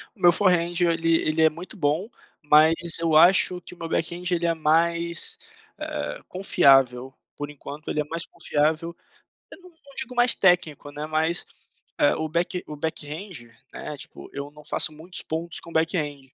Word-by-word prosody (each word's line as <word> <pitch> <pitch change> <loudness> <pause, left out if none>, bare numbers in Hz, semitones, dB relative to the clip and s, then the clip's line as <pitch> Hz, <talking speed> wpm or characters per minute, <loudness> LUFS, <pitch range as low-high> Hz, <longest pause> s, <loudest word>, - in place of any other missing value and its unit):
O - - -26
meu 175 - +7
forehand 175 -2 +1
ele 165 -1 +2
ele 155 +1 0
é 160 - +6
muito 170 +6 -10
bom, 160 +6 0 0.3
mas 155 +2 +5 0.2
eu 165 -2 +1
acho 180 +2 +5
que 180 - -9
o - - -25
meu 165 -1 -6
backhand 170 +2 -2
ele 170 -1 0
é 165 - +2
mais, 170 - +2 0.4
ah, - - -5
confiável, 135 -8 +3 0.2
por 145 0 -5
enquanto 150 +1 -9
ele 150 - 0
é - - -5
mais 165 +2 -4
confiável. 160 +3 -1 0.6
Eu - - -11
não 365 - -15
não 280 -4 -19
digo 260 -1 -4
mais 245 0 +5
técnico, 175 -6 +1
né, 150 +1 -6
mas, 160 +2 0 0.5
eh, 145 - +4
o 160 0 -3
back 170 +3 -2
o 150 - -8
backhand 155 - -6 0.2
né, 150 - -7
tipo, - - -10
eu 140 0 -6
não 150 0 -16
faço 155 - 0
muitos 160 +4 -4
pontos 165 +2 -4
com 170 - -13
backhand, 160 -4 -1
165 Hz, 175 wpm, -24 LUFS, 150-175 Hz, 0.6 s, meu